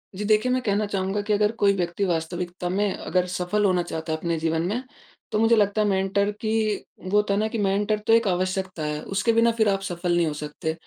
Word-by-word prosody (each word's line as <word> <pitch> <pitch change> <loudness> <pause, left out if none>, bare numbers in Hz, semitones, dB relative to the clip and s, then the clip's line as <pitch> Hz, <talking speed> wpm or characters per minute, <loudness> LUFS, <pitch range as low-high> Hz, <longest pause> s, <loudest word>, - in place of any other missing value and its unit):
जी। 210 +2 -4
देखिए 215 +4 +3
मैं 255 0 +1
कहना 210 -1 0
चाहूँगा 195 0 -1
कि 210 - +2
अगर 210 +1 +2
कोई 200 -1 +4
व्यक्ति 175 +1 -1
वास्तविकता 175 +1 -3
में 200 +2 +1
अगर 180 -1 -1
सफल 195 +4 0
होना 180 -2 +2
चाहता 160 -1 -4
अपने 165 +1 -2
जीवन 160 0 0
में, 210 +9 -2 0.5
तो 215 - +1
मुझे 225 +1 +5
लगता 210 0 +2
है 210 - +2
मेंटर 195 +1 +1
कि 215 -1 0 0.2
वो 185 - -6
होता 210 -1 +2
हैं 200 - +1
न 220 - +1
कि 230 - -4
मेंटर 205 +2 +1
तो 225 - +5
एक 230 -1 +4
आवश्यकता 185 -1 -1
है। 150 0 -3
उसके 210 +4 +2
बिना 230 +1 +4
फ़िर 220 -2 +2
आप 195 -1 0
सफल 175 -2 -2
नहीं 175 -1 +3
हो 155 - -2
सकते। 150 +2 -4
195 Hz, 230 wpm, -24 LUFS, 175-210 Hz, 0.5 s, मुझे